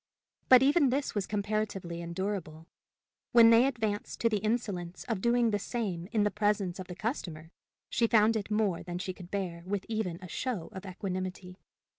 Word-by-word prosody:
But 255 0 +9
even 285 0 +4
this 275 +2 -1
was 205 -3 -2
comparatively 205 -4 -2
endurable: 170 -2 -4 0.7
when 230 -1 +8
they 230 +3 +6
advanced 220 -6 -2
to 230 - +4
the 215 -2 0
insolence 200 -5 -2
of 225 -6 -3
doing 235 0 +3
the 205 - 0
same 195 -6 -3
in 215 -2 +2
the 205 - +1
presence 205 -3 0
of 185 - -6
the 180 - -7
customer, 170 - -4 0.4
she 230 - +1
found 220 0 +4
it 215 -1 -2
more 210 -4 +1
than 175 -1 -5
she 185 +1 -4
could 180 -1 -12
bear 185 -4 -3
with 195 +1 -3
even 215 -7 -2
a 185 - -9
show 220 -3 -3
of 190 +1 -8
equanimity. 185 0 -5
205 Hz, 180 wpm, -30 LUFS, 180-225 Hz, 0.7 s, But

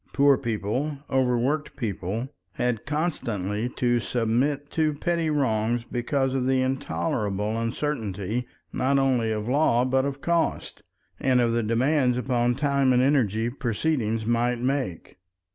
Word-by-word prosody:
Poor 140 0 +5
people, 125 +4 -2
overworked 130 +3 +1
people, 110 +1 -3 0.2
had 120 +1 -2
constantly 115 - -2
to 120 -1 +1
submit 125 +6 0
to 155 -2 +1
petty 170 +1 0
wrongs 120 -5 +1
because 130 +3 -1
of 130 -1 0
the 130 0 +3
intolerable 110 -5 -1
uncertainty 115 -2 -2 0.3
not 140 +2 +1
only 130 -5 +2
of 105 0 -3
law 125 -2 +3
but 130 +1 +2
of 140 0 -3
cost, 170 +2 -1 0.4
and 130 -1 +3
of 120 -1 +2
the 115 - +1
demands 125 +3 +2
upon 125 -1 +1
time 140 -2 +2
and 125 0 +4
energy, 115 -6 +2
proceedings 115 -3 -1
might 120 +1 +1
make. 125 - -3
125 Hz, 130 wpm, -25 LUFS, 115-140 Hz, 0.4 s, Poor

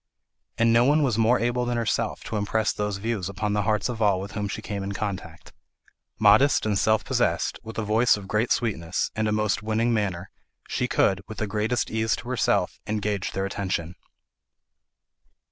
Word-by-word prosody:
And 115 0 +4
no 115 +1 +5
one 145 +4 +4
was 120 -5 +1
more 115 +3 +4
able 120 +1 0
than 120 0 -1
herself 115 -2 -1
to - - -5
impress 105 +1 0
those 105 -1 -2
views 100 -3 -2
upon 105 +1 -2
the 105 - +1
hearts 105 -1 +1
of 120 -3 -5
all 100 -3 +3
with 100 +2 -6
whom 105 -1 -3
she 100 - -4
came 100 -1 -4
in 100 +1 -4
contact. 95 -5 -6 0.6
Modest 110 +7 +5
and 105 -2 +1
self 110 +1 +2
possessed, - - 0
with 110 - -9
a 110 - -1
voice 110 +2 +3
of 100 -2 -9
great 110 +4 0
sweetness, 90 -7 -1
and 110 0 0
a - - 0
most 105 +1 0
winning 110 +2 0
manner, 95 -4 -2 0.4
she - - -1
could, 95 -1 +2
with 110 - -8
the 110 - -1
greatest 105 +4 -1
ease 110 0 +1
to 120 - -9
herself, 125 - 0
engage 105 -2 -2
their 95 0 -1
attention. 95 -4 -3
105 Hz, 190 wpm, -25 LUFS, 100-115 Hz, 0.6 s, no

